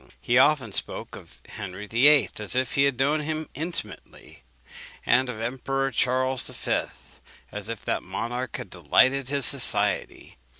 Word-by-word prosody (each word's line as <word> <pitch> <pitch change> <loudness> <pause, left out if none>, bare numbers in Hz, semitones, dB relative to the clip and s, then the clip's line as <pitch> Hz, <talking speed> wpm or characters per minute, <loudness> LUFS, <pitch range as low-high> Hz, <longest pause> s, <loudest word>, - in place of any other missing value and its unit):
He 120 +2 +2
often 130 -5 +3
spoke - - -2
of - - -15
Henry 100 -1 -8
VIII. 125 +1 +4
as 105 +3 -2
if 130 +3 -1
he 140 -2 +3
had 140 -3 0
known 145 +4 +1
him 155 +1 -4
intimately, 155 - -7 0.6
and 125 +1 +2
of 120 - -6
the 115 - -4
Emperor 135 +2 -2
Charles 130 +1 0
V. - - -2 0.7
as 105 +1 -5
if 115 -2 -7
that - - -1
monarch 120 +2 -5
had - - -9
delighted 135 0 +2
in 140 - -2
his 140 -3 +4
society. - - +3
130 Hz, 160 wpm, -25 LUFS, 115-140 Hz, 0.7 s, VIII